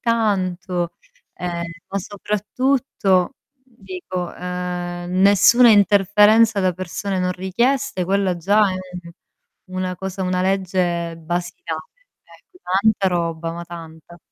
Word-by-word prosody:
tanto, 185 -6 -1 0.4
ehm, 175 -1 -4 0.3
ma 200 - -2
soprattutto 210 +1 0 0.3
dico, 250 - -7
ehm, 180 -1 -4
nessuna 205 +5 +6
interferenza 210 +2 +5
da 185 -1 +2
persone 185 +2 -4
non 180 0 0
richieste, 190 +2 0
quella 190 -1 +1
già 200 +4 +3
è 185 - -4 0.9
una 185 0 -3
cosa 190 +1 -5
una 185 0 0
legge 180 -3 0
basilare. 165 -1 -4 0.4
È 360 - -21
tanta 195 +1 +2
roba, 165 -2 -2
ma 170 0 -7
tanta. 170 0 -11
185 Hz, 105 wpm, -21 LUFS, 175-205 Hz, 0.9 s, nessuna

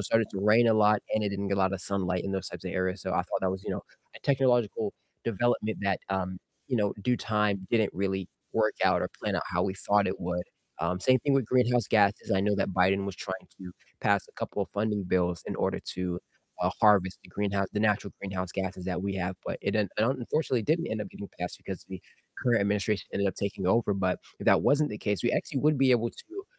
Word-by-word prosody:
started 110 +2 +2
to 95 - -4
rain 110 +3 +5
a 110 - +5
lot 105 -1 +5
and 110 - +2
it 100 - 0
didn't 100 0 -3
get 100 - +1
a - - +1
lot 95 0 +2
of 95 - -3
sunlight 90 -2 -1
in 100 - -2
those 95 -2 -2
types - - -9
of - - -3
areas, 95 +1 -1
so 95 - -3
I - - +1
thought 90 - -3
that 95 - +2
was, 95 +1 -4
you - - -3
know, - - -3 0.3
a - - -11
technological 120 -6 +2 0.3
development 115 0 0
that, 100 -2 +1
um, 95 -1 -2 0.3
you 125 - +1
know, 105 -2 +1
due 125 +2 +2
time 105 -3 0
didn't 110 -3 +2
really 95 -1 -1 0.2
work - - +2
out - - +4
or - - -1
plan - - 0
out - - -1
how - - 0
we 95 -1 -1
thought 100 +1 +2
it - - -3
would, 90 0 -2 0.4
um, 90 +2 -1
same 130 +4 +5
thing 145 - +1
with 135 - +3
greenhouse 125 -3 +3
gases, 100 -2 +3
I 95 -1 +3
know 105 +1 +2
that 100 - 0
Biden 95 +2 +3
was 100 - -4
trying 95 0 -6
to 90 -2 -9 0.3
pass 100 -1 +2
a - - -19
couple 100 - -3
of - - -7
funding 105 -1 -1
bills 90 -2 +1
in - - -3
order - - 0 0.2
to, 90 -1 -2 0.4
uh, - - +2
harvest 100 -4 +4
the - - -16
greenhouse 100 -1 -1
the 105 - -1
natural 105 -2 +1
greenhouse 95 -2 -3
gases 95 -1 -3
that 90 -1 -2
we 100 -1 -2
have, 95 0 -2
but - - -3
it - - 0
un 105 -3 +2
un 120 +5 +3
unfortunately 125 -2 0
didn't 165 +6 +1
end 110 0 -2
up 105 - -4
getting 100 - -8
passed 90 0 -4
because 95 -2 -7
the 95 -1 -7 0.4
current 120 -4 +3
administration 100 +1 0
ended 100 0 +1
up 95 - -3
taking 100 -2 -3
over, 110 +2 +3
but 95 -2 0 0.2
if - - -7
that - - +6
wasn't 150 +1 +3
the 105 - -5
case, 105 -2 -1
we 120 - +2
actually 140 - -1
would 150 -1 +3
be 135 -1 +5
able 120 -1 +2
to, 390 +4 -10
100 Hz, 245 wpm, -29 LUFS, 95-110 Hz, 0.4 s, that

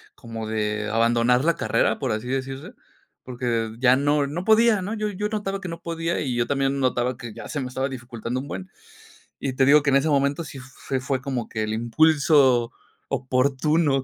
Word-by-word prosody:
como 115 -1 -7
de 105 0 -2
abandonar 115 +3 +3
la 170 0 +2
carrera, - - +1
por 130 -5 -1
así 110 +3 -4
decirse, 135 - -4 0.5
porque 120 -3 -2
ya 125 +1 +4
no 145 +1 +2
no 160 +6 -5
podía, 220 -2 +4
¿no?, 205 +4 -4
yo 215 -1 -2
yo 205 +1 -3
notaba 205 -2 -3
que 185 - -7
no 165 0 -7
podía 165 0 -2
y 130 -4 -2
yo 120 0 0
también 135 0 0
notaba 125 -1 0
que 120 -4 -8
ya - - -9
se 145 - -3
me 130 - -3
estaba 130 +2 -2
dificultando 125 -1 -5
un 140 - -7
buen, 95 0 -7 0.7
y 135 - -3
te 130 +1 +2
digo 150 +3 +6
que 140 - +1
en 135 - +4
ese 145 +3 +2
momento 140 +2 +1
sí 145 -3 -9
fue 130 0 -5
fue 130 0 -2
como 130 -4 -3
que 110 -1 -3
el 110 0 -2
impulso 130 0 +3 0.4
oportuno 135 +3 +1
135 Hz, 200 wpm, -24 LUFS, 120-150 Hz, 0.7 s, digo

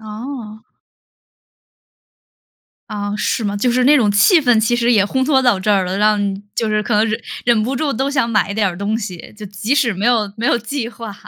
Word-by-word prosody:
哦。 220 0 -8 2.3
啊， 205 -1 -4
是 225 - -1
吗？ 205 0 -2
就 245 +5 0
是 250 +1 +1
那 290 +3 +6
种 220 -7 +2
气 205 - +4
氛 245 -4 +3
其 220 +2 +1
实 240 0 +1
也 205 -3 +3
烘 260 +4 -1
托 270 -1 +3
到 245 -7 +2
这 210 +2 +1
儿 195 -2 +2
了， 180 +1 -3
让 210 0 +3 0.4
就 225 - 0
是 215 0 0
可 235 - -4
能 215 +1 +3
忍 215 - -2 0.2
忍 235 -2 +2
不 260 +5 -2
住 290 +2 -1
都 270 +3 -2
想 260 -5 0
买 220 -2 0
一 - - -4
点 215 -1 +1
儿 175 - -6
东 205 +4 -2
西， 190 -6 -8
就 210 - -8
即 205 +5 -3
使 255 -7 +2
没 195 +3 -4
有 220 -5 +1
没 225 - -5
有 - - +2
计 235 +1 -4
划， 230 -3 -9
220 Hz, 240 characters per minute, -17 LUFS, 205-245 Hz, 2.3 s, 那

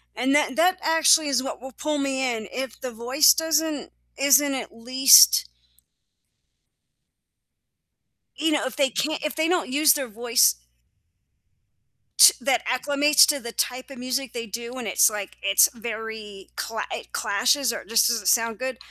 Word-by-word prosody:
and 260 +5 0
that 290 -3 0
that 365 +3 +2
actually 320 -1 +3
is 255 -2 0
what - - -7
will 265 +1 -10
pull 300 +5 -4
me 275 -1 -3 0.2
in. 215 -2 -8
If 260 -2 -6
the 255 -2 -7
voice 255 +5 +3
doesn't 320 -3 -2 0.3
isn't 280 0 +3
at 245 -4 -7
least 245 - +5 2.9
you 315 +1 -1
know, 300 - -1
if 260 - -6
they 275 -2 +1
can't 305 +3 -3
if 300 - -4
they 315 0 -1
don't 355 -5 -1
use 290 0 +3
their 270 -3 -4
voice 235 - +1 1.6
to - - +8
that 265 +2 0
acclimates 285 +3 +3
to 290 -1 -1
the 235 -2 -9
type 250 +3 -4
of 275 - -12
music 255 0 -4
they 230 -1 -6
do, 235 +3 -8
and 250 -5 -7
it's, 195 - +3
like, 210 -2 -8
it's 195 0 +3
very 220 -3 -9
cla 225 -1 -5
it - - -8
clashes 245 +5 0
or - - -7
just 230 0 +2
doesn't 225 -5 -3
sound 230 -1 +1
good, 260 -2 -5
255 Hz, 160 wpm, -23 LUFS, 230-290 Hz, 2.9 s, to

